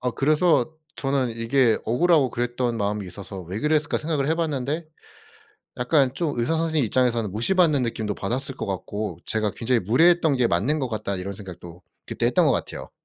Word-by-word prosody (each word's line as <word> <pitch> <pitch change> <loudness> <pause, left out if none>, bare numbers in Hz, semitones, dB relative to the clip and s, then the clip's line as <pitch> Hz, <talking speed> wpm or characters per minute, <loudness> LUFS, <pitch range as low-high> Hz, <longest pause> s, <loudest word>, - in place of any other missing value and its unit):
아 125 0 -1
그래서 155 +4 +2 0.2
저는 135 -2 0
이게 115 0 +2
억울하고 145 +2 +3
그랬던 120 0 -2
마음이 105 -1 -2
있어서 95 +2 -7
'왜 90 +5 -6
그랬을까?' 150 -1 +1
생각을 150 -3 -1
해봤는데 155 -1 -1 0.9
약간 130 +1 +2
좀 150 -4 -2
의사 120 +8 +1
선생님 160 -4 +1
입장에서는 120 -2 +1
무시받는 150 - +3
느낌도 110 -3 -2
받았을 130 +7 -3
것 - - -4
같고 100 -1 -4
제가 110 -2 0
'굉장히 120 +1 +1
무례했던 160 - +4
게 125 -2 +3
맞는 130 - +1
것 130 -3 -2
같다.' 105 -3 -3
이런 95 +2 -5
생각도 90 -3 -10 0.2
그때 - - -1
했던 - - +3
거 - - +4
같아요. - - -4
125 Hz, 400 characters per minute, -24 LUFS, 105-150 Hz, 0.9 s, 무례했던